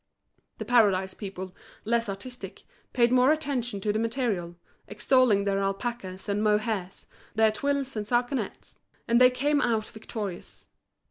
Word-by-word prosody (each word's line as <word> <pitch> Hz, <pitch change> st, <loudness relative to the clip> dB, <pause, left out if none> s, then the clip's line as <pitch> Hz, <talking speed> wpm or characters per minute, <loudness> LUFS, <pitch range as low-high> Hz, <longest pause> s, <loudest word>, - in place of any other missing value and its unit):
The -, -, -5 dB
Paradise 200 Hz, -6 st, +3 dB
people, 190 Hz, -2 st, -7 dB, 0.3 s
less 230 Hz, 0 st, +1 dB
artistic, 245 Hz, +6 st, -8 dB, 0.3 s
paid 240 Hz, -1 st, +3 dB
more 255 Hz, +2 st, +5 dB
attention 265 Hz, -8 st, -1 dB
to 210 Hz, +1 st, 0 dB
the 215 Hz, -, 0 dB
material, 225 Hz, -7 st, -1 dB, 0.3 s
extolling 210 Hz, 0 st, +3 dB
their 200 Hz, -1 st, 0 dB
alpacas 195 Hz, -1 st, -4 dB
and 205 Hz, 0 st, 0 dB
mohairs, 210 Hz, -3 st, -1 dB, 0.3 s
their 220 Hz, 0 st, +4 dB
twills 275 Hz, +3 st, -2 dB
and 215 Hz, -, -2 dB
sarcenets. 245 Hz, +3 st, -2 dB, 0.3 s
And 235 Hz, +1 st, +4 dB
they 250 Hz, -, +9 dB
came 285 Hz, +4 st, +1 dB
out 225 Hz, -4 st, +1 dB
victorious. 210 Hz, -4 st, -7 dB
220 Hz, 135 wpm, -27 LUFS, 200-250 Hz, 0.3 s, they